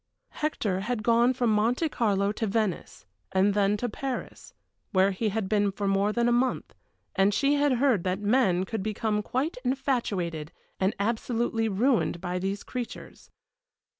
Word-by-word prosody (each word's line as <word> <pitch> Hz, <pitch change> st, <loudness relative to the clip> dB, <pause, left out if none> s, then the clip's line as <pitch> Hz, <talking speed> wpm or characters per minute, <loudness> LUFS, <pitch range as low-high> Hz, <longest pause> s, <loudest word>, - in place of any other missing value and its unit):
Hector 220 Hz, -11 st, -1 dB
had 215 Hz, +2 st, -2 dB
gone 235 Hz, +2 st, +4 dB
from 245 Hz, -3 st, +1 dB
Monte 235 Hz, +9 st, +2 dB
Carlo 200 Hz, -6 st, +1 dB
to 220 Hz, +1 st, -2 dB
Venice, 205 Hz, -, -2 dB, 0.3 s
and 190 Hz, +2 st, +3 dB
then 205 Hz, 0 st, +2 dB
to 245 Hz, -, -2 dB
Paris, 260 Hz, +3 st, -5 dB, 0.4 s
where 190 Hz, +1 st, +4 dB
he 210 Hz, +3 st, -1 dB
had 210 Hz, -1 st, -2 dB
been 205 Hz, 0 st, +2 dB
for 200 Hz, +1 st, -3 dB
more 195 Hz, +1 st, +2 dB
than 235 Hz, +2 st, +1 dB
a -, -, +3 dB
month, 250 Hz, +2 st, 0 dB, 0.4 s
and 195 Hz, +1 st, +4 dB
she 280 Hz, +5 st, +3 dB
had 290 Hz, -1 st, +3 dB
heard 245 Hz, -7 st, +2 dB
that 185 Hz, 0 st, 0 dB
men 205 Hz, -4 st, +2 dB
could 220 Hz, +2 st, -4 dB
become 215 Hz, +1 st, -1 dB
quite 260 Hz, +9 st, -2 dB
infatuated 220 Hz, -, -1 dB, 0.3 s
and 190 Hz, +2 st, +1 dB
absolutely 225 Hz, +1 st, 0 dB
ruined 220 Hz, -2 st, +1 dB
by 180 Hz, +1 st, -3 dB
these 195 Hz, +2 st, -3 dB
creatures. 250 Hz, -2 st, -7 dB
215 Hz, 160 wpm, -27 LUFS, 195-245 Hz, 0.4 s, gone